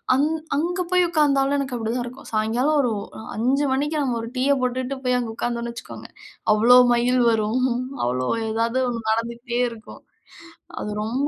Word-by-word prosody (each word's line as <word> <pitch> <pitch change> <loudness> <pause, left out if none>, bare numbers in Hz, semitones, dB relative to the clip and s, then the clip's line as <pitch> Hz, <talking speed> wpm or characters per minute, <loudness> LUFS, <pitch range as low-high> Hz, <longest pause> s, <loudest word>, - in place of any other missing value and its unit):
அங் 280 +3 +3 0.3
அங்க 350 +5 -1
போய் 360 -1 +4
உட்காந்தாலும் 285 -4 +2
எனக்கு 275 -2 -3
அப்பிடிதான் 235 +1 -2
இருக்கும். 250 +2 -10
சாயங்காலம் 235 +8 +1
ஒரு 245 -4 0 0.3
அ - - -8
5:00 260 +6 +1
மணிக்கு 295 +4 -1
நம்ம 250 -4 -1
ஒரு 230 - -6
டீய 270 +3 +3
போட்டுட்டு 255 +2 -2
போய் 250 0 +2
அங்க 230 -2 -4
உட்கார்ந்தோன்னு 235 0 -3
வச்சுக்கோங்க, 235 - -10 0.4
அவ்ளோ 235 +4 +6 0.2
மயில் 245 +1 +2
வரும் 225 +3 +1 0.4
அவ்ளோ 125 +1 -1 0.2
எதாவது 230 +3 0
1 230 -2 -3
நடந்துகிட்டே 235 +2 -2
இருக்கும். 225 -1 -12 0.8
அது - - -4
ரொம்ப 255 +6 -1
245 Hz, 160 wpm, -23 LUFS, 230-275 Hz, 0.8 s, அவ்ளோ